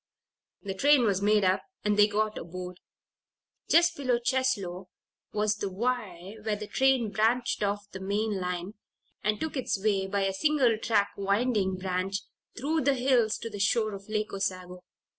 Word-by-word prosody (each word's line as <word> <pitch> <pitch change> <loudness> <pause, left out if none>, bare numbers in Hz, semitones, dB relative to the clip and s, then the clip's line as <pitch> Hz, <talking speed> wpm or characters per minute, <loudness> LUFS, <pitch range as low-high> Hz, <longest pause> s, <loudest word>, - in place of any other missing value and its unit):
The 195 -2 -3
train 280 +6 +4
was 200 -4 +1
made 210 0 +3
up 185 0 +2 0.2
and 210 0 +3
they 205 0 +6
got 215 +1 -1
aboard. 180 +1 -7 0.9
Just 340 0 +5
below 255 -6 +1
Cheslow 210 -8 -1 0.4
was 210 0 0
the 200 -2 -3
Y 205 -3 -3
where 215 0 -1
this 210 0 -8
train 260 -4 +2
branched 230 +3 +1
off 205 0 -1
the 190 - -7
main 205 +1 -1
line, 180 +2 -3 0.5
and 210 0 +1
took 315 -1 -3
its 255 -6 -1
way 195 -2 +1
by 200 +1 -1
a 195 0 0
single 270 0 +3
track, 210 -3 +1
winding 200 -1 +1
branch, 185 +1 -2 0.4
through 310 +6 0
the 280 +1 +2
hills 245 -4 +2
to 230 - -6
the 205 - -7
shore 215 +2 +2
of 195 +1 -9
Lake 215 0 -1
Osago. 185 -2 -3
210 Hz, 165 wpm, -28 LUFS, 195-240 Hz, 0.9 s, they